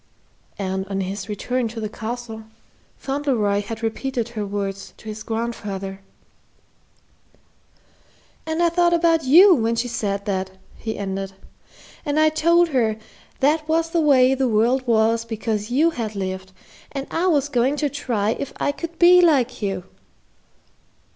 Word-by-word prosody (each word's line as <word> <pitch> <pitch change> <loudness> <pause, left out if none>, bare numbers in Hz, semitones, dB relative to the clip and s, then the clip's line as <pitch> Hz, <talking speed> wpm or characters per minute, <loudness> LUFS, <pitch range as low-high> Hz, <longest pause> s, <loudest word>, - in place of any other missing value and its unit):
And 190 0 -3
on 195 -1 -2
his 195 +2 -5
return 245 +4 -1
to 225 +1 -7
the 215 - -3
Castle, 225 0 -6 0.5
Fauntleroy 255 -8 0
had 225 +2 -7
repeated 235 +1 -2
her 220 -3 -4
words 195 -1 -4
to - - -14
his 215 0 -6
grandfather. 205 -4 -4 2.5
"And 320 +2 0
I 340 - +4
thought 345 0 +3
about 330 -2 +2
you 355 +9 +8
when 230 -5 +1
she 235 +2 -1
said 200 -4 -3
that," 190 -1 -3 0.2
he 220 -1 -5
ended; 195 -1 -4 0.7
"and 295 0 0
I 310 0 +5
told 335 +2 +3
her 230 -6 +1 0.4
that 305 +3 +2
was 330 +1 +1
the 335 - +2
way 265 -4 +5
the 265 -1 0
world 240 +4 +2
was 225 0 +3
because 220 -1 -3
you 300 +7 +3
had 225 -7 -4
lived, 190 -1 -4 0.4
and 275 -1 -4
I 345 +3 0
was 290 -5 +2
going 260 0 +1
to 295 0 0
try 235 -7 -1
if 280 +4 -4
I - - +1
could 335 +3 -7
be 355 +1 +7
like 270 -9 +2
you." 195 -3 -2
235 Hz, 150 wpm, -22 LUFS, 210-290 Hz, 2.5 s, you